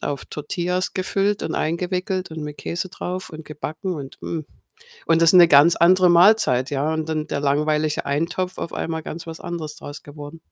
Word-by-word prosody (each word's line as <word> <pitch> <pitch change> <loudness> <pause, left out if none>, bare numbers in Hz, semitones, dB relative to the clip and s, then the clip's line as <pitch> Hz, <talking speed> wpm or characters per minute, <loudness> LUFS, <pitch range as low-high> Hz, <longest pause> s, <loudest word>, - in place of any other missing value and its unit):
auf 145 -1 -4
Tortillas 180 +4 -3
gefüllt 195 +2 0
und - - -3
eingewickelt 180 +2 -2
und 160 -1 -6
mit 150 0 -7
Käse 175 +2 -4
drauf 185 +1 -6
und 155 0 -9
gebacken 155 +4 -5
und, 140 -4 -8
mm, 165 - -4 0.7
und 165 0 +3
das 165 - +6
ist - - 0
'ne 175 -1 +9
ganz 155 +3 +6
andere 180 +2 +5
Mahlzeit, 170 - +4
ja? 145 +2 0
Und 160 0 -3
dann 155 -1 -2
der - - -2
langweilige 150 +2 0
Eintopf 170 +6 -2
auf 165 - -5
einmal 160 -1 -3
ganz 165 +2 -7
was 160 - -7
anderes 160 -3 -6
draus 145 0 -9
geworden. 145 +2 -10
160 Hz, 190 wpm, -22 LUFS, 150-180 Hz, 0.7 s, ne